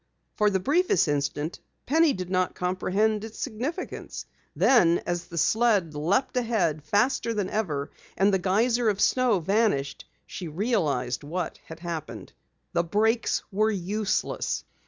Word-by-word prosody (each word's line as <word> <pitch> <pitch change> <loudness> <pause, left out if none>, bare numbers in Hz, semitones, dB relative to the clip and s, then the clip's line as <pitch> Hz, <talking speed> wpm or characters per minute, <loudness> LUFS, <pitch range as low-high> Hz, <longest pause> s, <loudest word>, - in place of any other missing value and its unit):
For 210 -1 +3
the 190 -2 0
briefest 295 - +2
instant 145 +2 -2 0.3
Penny 320 +2 +4
did 185 -1 -6
not 185 -1 0
comprehend 195 +4 0
its 225 0 -8
significance. 270 - -5 0.3
Then, 175 -10 +4
as 175 0 -2
the 170 - -9
sled 205 -2 +2
leaped 175 - 0
ahead 205 - 0
faster 230 - +1
than 200 -3 -2
ever 155 -10 -2 0.3
and 195 +1 +3
the 190 - +3
geyser 225 +6 +2
of 200 -2 -1
snow 245 -3 +3
vanished, 185 -6 0 0.2
she 180 - -7
realized 155 - -1
what 175 +5 -4
had 160 0 -10
happened. 170 -3 -6 0.4
The 170 - +2
brakes 220 +7 +1
were 215 +3 +2
useless! 205 +1 -1
195 Hz, 135 wpm, -26 LUFS, 170-225 Hz, 0.4 s, Penny